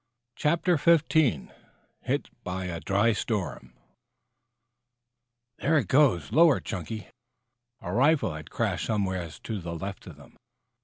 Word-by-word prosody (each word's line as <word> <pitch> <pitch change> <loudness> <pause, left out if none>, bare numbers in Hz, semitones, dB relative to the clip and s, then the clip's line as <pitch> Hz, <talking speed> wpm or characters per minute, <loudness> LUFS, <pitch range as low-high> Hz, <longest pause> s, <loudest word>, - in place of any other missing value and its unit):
CHAPTER 170 +3 +2
XV 165 +1 +4 1.0
HIT - - -1
BY 95 +1 -4
A 85 -2 -4
DRY 100 +6 +2
STORM 95 - -3 1.9
"There 160 +2 +2
it 145 - 0
goes! 130 - +3
Lower, 160 -3 +5
Chunky!" 105 +4 -6 0.7
A 90 - -5
rifle 135 - +3
had 80 0 -9
crashed - - -2
somewhere 95 -5 -1
to 105 +6 -6
the 85 0 -5
left 95 +4 -7
of 85 - -10
them. 70 -3 -18
100 Hz, 120 wpm, -27 LUFS, 85-140 Hz, 1.9 s, Lower